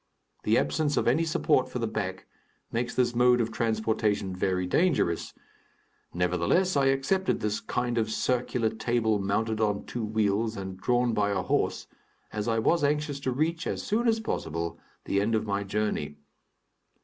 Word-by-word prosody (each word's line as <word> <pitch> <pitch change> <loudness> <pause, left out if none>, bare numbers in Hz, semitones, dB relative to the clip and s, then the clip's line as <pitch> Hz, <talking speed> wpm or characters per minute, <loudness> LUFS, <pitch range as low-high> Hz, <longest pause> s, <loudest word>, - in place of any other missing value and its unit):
The 110 - +4
absence 150 -2 +1
of - - +1
any 140 +8 +3
support 160 - +2
for - - -4
the - - -1
back - - -4 0.5
makes 120 +1 -2
this 120 -1 +2
mode 125 +1 +4
of 115 -1 0
transportation 110 -3 0
very 90 0 0
dangerous; 110 - +1 0.8
nevertheless, 90 - +1
I 140 -1 +3
accepted 135 +9 +1
this 105 0 -1
kind 120 +1 -1
of 110 -1 0
circular 120 0 0
table 110 -1 0
mounted 110 +3 -1
on 105 -2 0
two 120 - -4
wheels 110 +1 0
and 95 -1 -5
drawn 120 +4 +1
by 105 -1 +1
a 100 - 0
horse, - - 0 0.5
as 105 0 -3
I 115 -1 +1
was 155 +9 +2
anxious 145 0 0
to 130 -2 -2
reach, 160 +6 -1
as - - -3
soon 230 +3 0
as 225 -1 +3
possible, 85 - -3 0.3
the 100 - +1
end 110 +2 +1
of 110 - 0
my 100 -1 -1
journey. 100 -8 -2
110 Hz, 165 wpm, -28 LUFS, 100-130 Hz, 0.8 s, The